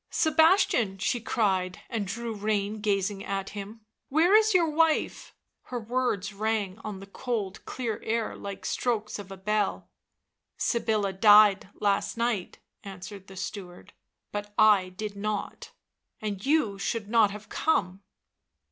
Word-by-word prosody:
" - - -55
Sebastian," 315 - +3
she 230 +5 -1
cried, 190 -5 0
and 220 -5 -3
drew 230 +3 -4
rein 210 0 -1
gazing 200 -1 0
at 195 -1 -3
him, 210 +2 -8
" - - -56
where 325 +7 +4
is 435 0 +6
your 355 -4 +4
wife 315 0 +1
?" - - -55
Her 245 - -3
words 225 -4 -1
rang 210 -1 -1
on 210 -3 -6
the 195 - -9
cold, 205 -2 -4
clear 230 -5 -4
air 225 0 -1
like 200 -1 -7
strokes 220 -4 -1
of 200 -2 -9
a 195 - -7
bell. 210 +1 -1 0.3
" - - -57
Sybilla 215 -4 0
died 205 0 +6
last 200 +2 0
night," 235 -5 -1 0.3
answered 195 0 -9
the 195 - -12
steward, 180 -3 -7 0.2
" - - -57
but 205 0 -5
I 210 -4 +5
did 205 +3 -6
nought. 210 0 -4 0.5
And 205 -3 -4
you 270 -10 +1
should 205 +1 -2
not 220 -1 +4
have 210 +1 -9
come." 190 - 0
210 Hz, 155 wpm, -27 LUFS, 195-230 Hz, 0.5 s, is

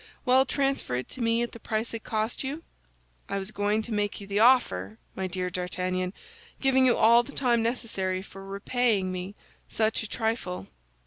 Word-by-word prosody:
"Well, 260 +1 +5
transfer 275 - 0
it 125 - -3
to 255 - -7
me 230 0 +2
at 240 - -4
the 230 - -10
price 220 +1 -2
it 225 - -5
cost 220 +3 -1
you?" 290 +5 -4 0.7
"I - - -1
was 195 +1 -4
going 210 +1 0
to 235 - -8
make 205 -1 -1
you 200 - -8
the 200 +1 -1
offer, 110 - +4 0.2
my 190 0 -2
dear 180 0 -3
D'Artagnan, 180 +1 -2 0.5
giving 265 -1 +4
you 245 - +4
all 230 +2 +7
the 250 +4 -10
time 240 -4 +2
necessary 200 -6 -2
for 195 0 -11
repaying 200 0 0
me 185 +2 -5 0.3
such 220 0 +1
a 220 - -6
trifle." 220 - -2
215 Hz, 185 wpm, -27 LUFS, 185-240 Hz, 0.7 s, all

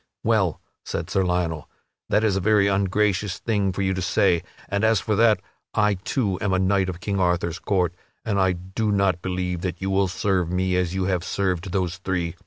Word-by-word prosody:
"Well," - - +2 0.2
said - - -4
Sir 95 - +2
Lionel, 90 -4 -1 0.4
"that 105 +2 +3
is 105 -3 +2
a - - +1
very 105 0 +4
ungracious 100 0 +1
thing 100 -4 0
for 95 +2 -2
you 95 0 +1
to 95 - -3
say. 85 -1 +2 0.3
And 100 +2 -1
as 110 -1 +4
for 110 - -1
that, 110 -3 +4 0.3
I 105 -1 +3
too 95 0 -1
am 100 -2 0
a - - +3
knight 95 0 +2
of 90 -2 -6
King 100 -1 -1
Arthur's 90 -1 0
court, 90 -5 0 0.3
but 110 -3 0
I 95 -1 +3
do 95 +5 -2
not 100 -3 +1
believe 90 -1 -2
that 90 -2 -3
you 95 0 -2
will 95 0 +2
serve 90 -2 0
me 90 0 0
as 90 0 0
you 95 - 0
have 90 -2 0
served 95 -2 -1
those 90 -2 -1
three. 90 -3 -2
95 Hz, 205 wpm, -24 LUFS, 90-100 Hz, 0.4 s, very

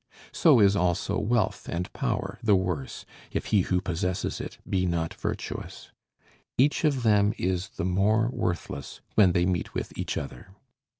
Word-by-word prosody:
So 150 -8 +5
is 100 -1 +5
also 90 -1 +1
wealth 115 -2 0
and 90 +2 -3
power 95 +4 -2
the 110 -4 +4
worse, 90 -8 -2 0.2
if - - -3
he 105 - +3
who 90 0 +1
possesses 90 +1 -2
it - - -7
be 95 -1 +1
not 85 -2 -1
virtuous. - - -5 0.7
Each 145 +6 +3
of 140 -5 +2
them 105 -1 +4
is 90 +1 -1
the 85 - -4
more 105 +5 +2
worthless, 80 -5 -3
when 95 -5 +5
they 90 0 +2
meet 90 -1 -1
with - - -4
each - - -3
other. 95 +10 -7
95 Hz, 160 wpm, -27 LUFS, 90-105 Hz, 0.7 s, So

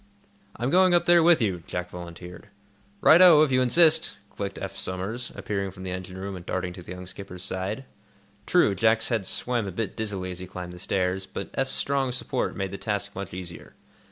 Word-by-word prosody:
"I'm 120 +4 -2
going 185 0 +5
up 175 0 +3
there 175 -1 +6
with 165 -6 +5
you," 95 -5 -1
Jack 90 0 -4
volunteered. 90 0 -9 0.5
"Right 165 +3 +7
o, 165 -4 +9
if 150 - +1
you 130 0 +3
insist," 160 0 +4
clicked 100 -1 -5
Eph - - -6
Somers, 100 +7 -4
appearing 100 -2 -3
from 95 0 -11
the 95 - -4
engine 95 0 -6
room 95 +1 -5
and 90 - -8
darting 90 0 -3
to 90 - -10
the 90 - -8
young 90 0 -8
skipper's 90 -1 -9
side. 95 +7 -4 0.6
True, 175 - +4
Jack's 110 +3 +2
head 110 -6 -1
swam 120 -4 -1
a - - -4
bit 105 +3 -4
dizzily 100 -5 -3
as 90 - -7
he 90 - -7
climbed 90 -1 -7
the 90 - -11
stairs, 95 +1 -1
but - - -6
Eph's 135 -1 -1
strong 135 -2 0
support 125 - -2
made 95 -1 -3
the 100 - -6
task 105 -1 -3
much 100 -1 -6
easier. 90 -1 -9
100 Hz, 210 wpm, -26 LUFS, 90-125 Hz, 0.6 s, o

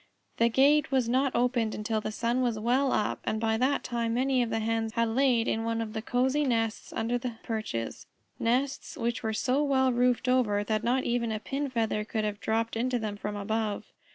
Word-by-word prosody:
The 230 0 +4
gate 285 +5 +4
was 260 -3 +2
not 260 +2 +1
opened 240 -2 +1
until 215 +1 -2
the 215 - -4
sun 235 +3 0
was 240 -3 0
well 250 +5 +2
up, 210 - 0
and 220 - -1
by 220 0 +1
that 260 +4 +1
time 235 -1 -1
many 260 0 +2
of 235 - 0
the 225 - -1
Hens 225 0 -1
had 230 -1 +1
laid 245 -1 +2
in 225 - 0
one 230 0 -1
of 220 -1 -4
the 220 - -3
cosy 260 +5 +1
nests 225 -4 -1
under 235 +2 -1
the 245 -1 -4
perches, 215 - -4 0.3
nests 260 +4 -1
which 235 0 -1
were 220 - -1
so 255 +5 +1
well 265 -2 +2
roofed 245 0 +2
over 230 -5 +2
that 215 +1 -1
not 250 +3 +1
even 235 -1 0
a 215 - -2
pin 275 +5 -3
feather 225 -3 0
could 220 0 -2
have 210 -1 -2
dropped 225 +1 -1
into 250 +2 0
them 215 -3 -3
from 205 0 -5
above. 210 +1 -2
230 Hz, 210 wpm, -28 LUFS, 220-255 Hz, 0.3 s, The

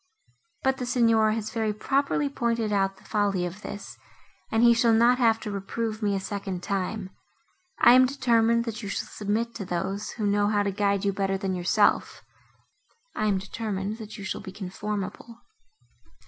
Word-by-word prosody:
But 265 0 +2
the 250 - -4
Signor 230 -3 +3
has 220 -1 -3
very 220 -2 0
properly 275 +6 0
pointed 235 -5 -1
out 195 -1 +1
the - - -20
folly 200 -4 0
of 180 +4 -7
this, 205 -1 -8 0.5
and 225 +1 +3
he 235 0 +7
shall 230 0 +3
not 240 +3 +4
have 225 -2 +4
to 210 - -5
reprove 215 +3 -3
me 205 -2 +1
a - - 0
second 195 -2 -5
time. 195 0 -3 0.7
I 240 - +7
am 255 0 +7
determined, 235 -3 +2
that 225 -1 -5
you 205 - -5
shall - - -3
submit 220 +3 -2
to 200 - -5
those, 190 +3 -3
who 215 - -3
know 205 0 +2
how 205 -1 +2
to 200 - -1
guide 200 0 0
you 200 - +1
better 195 0 0
than 190 -1 -2
yourself—I 215 - -2
am 200 -2 +2
determined, 200 +1 -4
that 215 -1 -8
you 200 - -8
shall 190 - -4
be 195 -2 -8
conformable." 210 +4 -6
210 Hz, 175 wpm, -26 LUFS, 195-230 Hz, 0.7 s, he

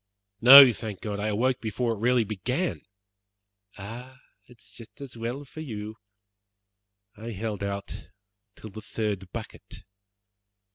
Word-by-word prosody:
"No, 130 +1 +10
thank 110 -3 -7
God, 105 -2 -5
I 105 - -2
awoke 125 +5 0
before 115 +2 -2
it 110 - -8
really 120 +1 +2
began." 125 - -3 1.0
"Ah! 120 +6 -10 0.3
it 125 - -18
is 100 - -16
just 115 +1 -15
as 140 -4 -10
well 120 +5 -5
for 150 - -12
you. 110 -7 -7 1.2
I 110 +2 -9
held 105 -1 -5
out 100 -5 -6 0.5
till 110 - -11
the 110 +2 -9
third 105 -4 -4
bucket. - - -10
115 Hz, 135 wpm, -26 LUFS, 105-125 Hz, 1.2 s, No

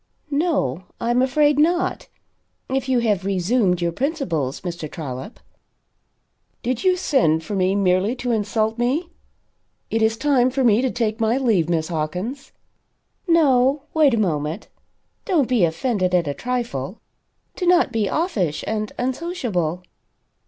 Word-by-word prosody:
"No, 280 - 0
I 235 0 0
am 245 +1 +3
afraid 290 +2 +3
not 345 +3 +1 0.6
if 265 0 -2
you 250 -2 +3
have 210 -5 +1
resumed 190 -1 +1
your 170 - +1
principles, 170 - -2
Mr. 170 -4 -5
Trollop." 145 - -7 1.2
"Did 245 -1 -2
you 370 -1 +3
send 195 - +2
for 205 - -4
me 190 0 +1
merely 195 +3 +2
to 245 -1 -3
insult 220 +1 0
me? 290 +9 0 0.8
It 225 - +1
is 220 0 +2
time 260 -2 +3
for 265 +1 -1
me 225 -1 +4
to 260 - +1
take 225 -2 -2
my 225 +2 +2
leave, 215 - +1
Miss 160 -1 0
Hawkins." 180 - -4 0.8
"No 275 -4 +3
wait 300 -6 +4
a - - 0
moment. 160 -2 -2 0.6
Don't 320 - +2
be 240 -8 +3
offended 185 +2 0
at 170 -3 +1
a 145 - -1
trifle. 235 - -4 0.6
Do 360 - -2
not 355 0 +4
be 215 -4 0
offish 210 - -1
and 215 -1 -2
unsociable. 245 - -2
225 Hz, 145 wpm, -22 LUFS, 180-265 Hz, 1.2 s, me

